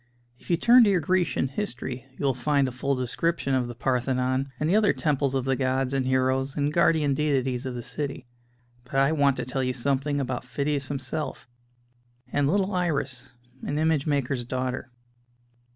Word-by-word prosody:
If - - -18
you 170 - +3
turn 240 +6 +7
to - - +4
your 190 -3 +3
Grecian 175 -3 +1
History 130 - -5
you - - -3
will 135 - +3
find 140 +2 +1
a - - -3
full 135 +3 -1
description 135 +4 -1
of 130 -2 +1
the 120 - -7
Parthenon 130 +2 0
and 150 - 0
the 180 - +3
other 215 -1 +4
temples 140 -3 0
of 130 -1 0
the 135 0 +1
gods 130 0 0
and 135 -1 0
heroes 130 +1 +1
and 145 +1 0
guardian 155 -4 +3
deities 135 -3 0
of 125 - -4
the 120 - -5
city. 140 0 -5 0.6
But 125 +2 -10
I 135 +2 +4
want 140 -3 +2
to - - -3
tell 130 +1 -2
you 125 0 0
something 140 +3 0
about 130 -2 -3
Phidias 140 +1 -2
himself, 140 0 -4 0.9
and 145 -1 +2
little 195 +2 +1
Iris, 140 -8 -1 0.3
an 145 - -3
image 155 -1 +1
maker's 140 -3 0
daughter. 130 +1 -3
135 Hz, 185 wpm, -26 LUFS, 130-150 Hz, 0.9 s, turn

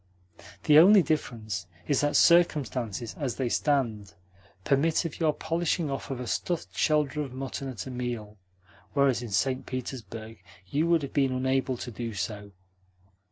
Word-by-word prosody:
The 150 0 +7
only 195 +3 +8
difference 115 - -3 0.2
is 145 - +2
that 145 0 +1
circumstances, 130 - +3
as 135 -5 -2
they 130 -3 -1
stand, 115 -9 0 0.5
permit 155 - +2
of 165 - -5
your 160 -2 +3
polishing 165 0 -1
off 135 - -5
a 125 -2 -4
stuffed 170 +7 -3
shoulder 150 -1 +1
of 135 -4 -5
mutton 135 +1 -5
at 115 -8 -6
a 130 - -6
meal; 120 -4 -5 0.5
whereas 140 -4 +3
in 120 - -6
St. 130 +5 0
Petersburg 115 -4 -6 0.2
you 145 - 0
would 170 -3 +3
have 140 - -6
been 135 -2 +2
unable 130 0 0
to 120 - -6
do 115 0 -5
so. 100 +2 -4
130 Hz, 155 wpm, -28 LUFS, 115-150 Hz, 0.5 s, only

